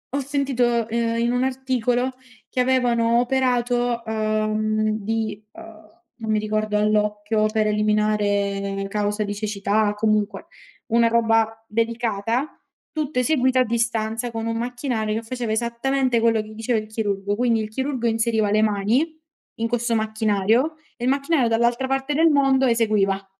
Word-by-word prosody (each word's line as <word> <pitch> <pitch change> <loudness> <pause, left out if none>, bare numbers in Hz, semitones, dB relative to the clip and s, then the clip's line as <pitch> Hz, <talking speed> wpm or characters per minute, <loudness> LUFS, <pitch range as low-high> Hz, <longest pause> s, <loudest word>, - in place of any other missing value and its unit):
ho - - +1
sentito, 255 -4 0
ehm, 230 0 -1
in 235 +1 +1
un 250 +1 +1
articolo 255 -1 0 0.4
che 255 - -4
avevano 240 -2 +2
operato, 245 -1 +1
uhm, 215 0 0
di, 220 -1 -2
uhm, 220 -1 -13 0.3
non 220 -1 -2
mi 215 - +2
ricordo, 215 0 -1
all'occhio 210 0 +1
per 215 0 +1
eliminare 205 -2 0
causa 210 +1 -1
di 205 0 -3
cecità, 205 0 0
comunque, 215 0 0 0.4
una 235 0 +3
roba 225 -1 +1
delicata, 230 +3 -2 0.3
tutto 300 -4 -2
eseguito 260 -1 +2
a - - +5
distanza 230 0 -1
con 225 0 -4
un 230 0 -1
macchinario 240 -2 -2
che 225 - -2
faceva 240 -2 -3
esattamente 240 +2 0
quello 225 -1 +2
che 215 - -11
gli 215 - -11
diceva 225 +2 0
il 215 - -8
chirurgo. 205 -2 -2
Quindi, 235 -2 +2
il 215 - -5
chirurgo 260 +1 -3
inseriva 225 -2 +1
le 215 +1 +3
mani 220 +10 +1 0.4
in 230 - 0
questo 240 0 0
macchinario 220 +5 +1 0.2
e 240 - -4
il 255 - +2
macchinario 275 -1 +1
dall'altra 235 +3 +1
parte 270 +2 -1
del 325 +2 +4
mondo 270 -2 +3
eseguiva. 210 -5 +1
225 Hz, 150 wpm, -22 LUFS, 215-245 Hz, 0.4 s, a